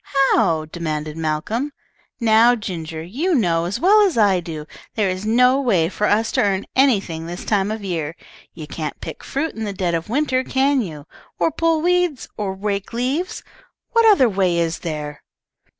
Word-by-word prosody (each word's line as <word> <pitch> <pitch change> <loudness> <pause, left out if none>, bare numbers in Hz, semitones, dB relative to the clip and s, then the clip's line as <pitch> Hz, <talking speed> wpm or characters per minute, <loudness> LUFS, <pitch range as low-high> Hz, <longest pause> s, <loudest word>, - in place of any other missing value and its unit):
"How?" 165 -8 +2
demanded 155 -2 -4
Malcolm. 165 - -2 0.5
"Now, 230 +1 +5
Ginger, 165 -7 -6
you 295 - -1
know, 170 - +1
as 195 +6 -3
well 410 +7 +5
as 385 - +2
I 200 -4 +4
do, 160 -3 -7 0.3
there 205 -4 +1
is 185 +3 -4
no 250 +4 +4
way 185 -11 +2
for 210 +2 -1
us 220 +2 +2
to 255 - +1
earn 195 -3 0
anything 195 -12 +2
this 175 +2 -7
time 200 -2 +1
of 215 -1 -4
year. 165 -4 -3 0.4
You 160 -3 -7
can't 155 0 -5
pick 160 - -8
fruit 305 +4 -2
in 225 - -5
the 205 -2 -3
dead 180 -3 -1
of 165 +3 -2
winter, 260 0 +1
can 270 +1 +2
you? 155 -8 -7 0.3
or 165 -2 +1
pull 330 -1 +1
weeds, 355 -6 +1
or 195 -2 -3
rake 200 +1 -3
leaves? 265 +10 -2 0.5
What 460 -1 +4
other 270 -12 +5
way 190 -4 +1
is 170 0 0
there?" 150 -3 -5
205 Hz, 180 wpm, -21 LUFS, 165-255 Hz, 0.5 s, Now